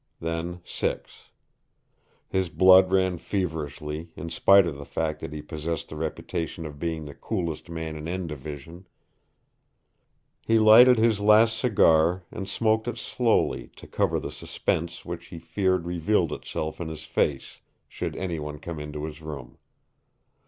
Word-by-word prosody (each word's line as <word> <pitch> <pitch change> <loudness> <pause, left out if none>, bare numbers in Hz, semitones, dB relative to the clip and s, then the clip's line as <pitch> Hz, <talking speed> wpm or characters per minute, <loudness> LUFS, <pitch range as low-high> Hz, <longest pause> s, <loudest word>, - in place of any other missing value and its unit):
Then 85 +2 -4
six. - - -4 1.0
His 95 -2 -1
blood 95 +1 +6
ran 95 -2 +2
feverishly, 80 -4 -4
in 85 - -6
spite 100 +3 +6
of 85 -4 -3
the - - -6
fact 75 +1 -2
that - - -6
he 75 -1 -6
possessed 80 +1 -4
the - - -7
reputation 80 +1 -4
of 75 -2 -8
being 80 -2 -3
the 70 - -8
coolest 85 -6 -4
man 80 -2 -5
in 75 +1 -6
N 90 +1 -3
Division. 75 +4 -8 1.5
He 115 - +2
lighted 115 +3 +8
his 110 -2 +3
last 110 +2 +5
cigar 90 -7 +3
and 95 -2 -6
smoked 110 +2 +1
it 120 -1 -3
slowly 115 - 0
to - - -13
cover - - 0
the - - -6
suspense 85 +1 -3
which 85 0 -6
he 85 - -9
feared 90 +2 0
revealed 85 0 +1
itself 80 +2 -5
in 85 - -3
his 80 -1 -7
face, 70 -4 -1 0.3
should - - -5
any 85 -4 -3
one 75 0 -6
come 80 +1 -7
into 75 0 -6
his 80 0 -8
room. 75 -5 -8
85 Hz, 150 wpm, -26 LUFS, 75-95 Hz, 1.5 s, lighted